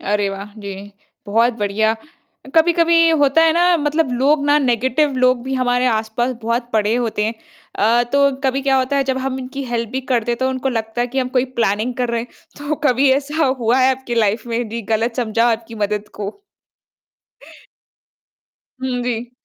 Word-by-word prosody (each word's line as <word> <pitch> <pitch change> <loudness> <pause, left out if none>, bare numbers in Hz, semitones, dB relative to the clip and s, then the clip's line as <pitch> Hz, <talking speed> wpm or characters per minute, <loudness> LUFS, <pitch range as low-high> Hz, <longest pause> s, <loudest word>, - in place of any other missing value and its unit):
अरे 205 0 0
वाह! 200 +1 -8
जी, 200 0 -8 0.3
बहुत 230 +4 +2
बढ़िया। 210 +2 +1 0.6
अ, - - -12
कभी-कभी 335 0 +4
होता 300 0 +3
है 320 - +4
ना 350 +1 +3
मतलब 295 -2 0
लोग 285 +2 +2
ना 290 +1 +4
नेगेटिव 260 +3 +1
लोग 255 -1 +3
भी 265 0 -3
हमारे 250 0 +1
आस-पास 225 +2 0
बहुत 235 +2 -2
पड़े 215 +1 +1
होते 225 -3 -1
हैं। 225 +1 -2 0.4
अ, 230 +4 +3
तो 280 0 +4
कभी 265 +1 +1
क्या 270 -1 +2
होता 260 +2 0
है 275 - +2
जब 265 0 -1
हम 265 0 -3
इनकी 265 +2 -6
हेल्प 235 -2 -2
भी 265 - -1
करते 240 0 +1
तो 260 - +2
उनको 260 0 -2
लगता 225 -1 -3
है 245 - +1
कि 265 +2 -4
हम 255 -1 0
कोई 250 - +2 0.2
प्लानिंग 220 +3 0
कर 245 -1 -2
रहे 235 -1 -1
हैं 240 - -8 0.3
तो 290 +1 -2
कभी 265 +2 +3
ऐसा 290 +3 0
हुआ 255 -2 +1
है 260 +1 +5
आपकी 260 -2 -5
लाइफ़ 220 +1 0
में 230 -1 -2
जी 230 +1 -5
गलत 230 +2 -1
समझा 230 -1 +1
हो - - +3
आपकी 225 0 -6
मदद 210 0 -3
को। 205 - -6 2.4
हुँ, 250 -2 -2
जी। 240 0 -3
245 Hz, 190 wpm, -19 LUFS, 225-270 Hz, 2.4 s, है